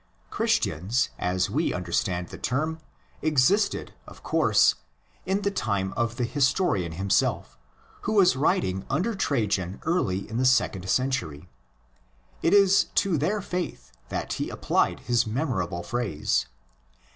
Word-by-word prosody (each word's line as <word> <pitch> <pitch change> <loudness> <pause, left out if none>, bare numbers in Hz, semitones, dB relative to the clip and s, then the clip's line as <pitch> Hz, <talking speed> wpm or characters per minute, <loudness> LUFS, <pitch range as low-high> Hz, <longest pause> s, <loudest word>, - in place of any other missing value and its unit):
Christians, 105 - 0
as 90 +1 0
we 155 +5 -1
understand 90 0 -2
the - - -9
term, 155 +6 -1 0.4
existed, 155 +8 +2
of - - -14
course, - - +4 0.5
in 195 +2 0
the 200 - +1
time 100 - -1
of 115 -1 -1
the 125 - -2
historian 130 - +1
himself, 95 +3 0 0.5
who 220 - -2
was 190 -8 +5
writing 95 -9 +1
under 180 +12 0
Trajan 105 - -1
early 100 - 0
in 110 - -5
the 125 - +1
second 95 -7 +2
century. 125 - -1 0.9
It 165 - +2
is 200 -1 +5
to 195 -4 +2
their 195 +7 0
faith 180 -1 -5 0.2
that - - -3
he - - -3
applied - - 0
his 120 -2 +1
memorable 105 - -2
phrase. 100 -6 -1
125 Hz, 130 wpm, -26 LUFS, -, 0.9 s, was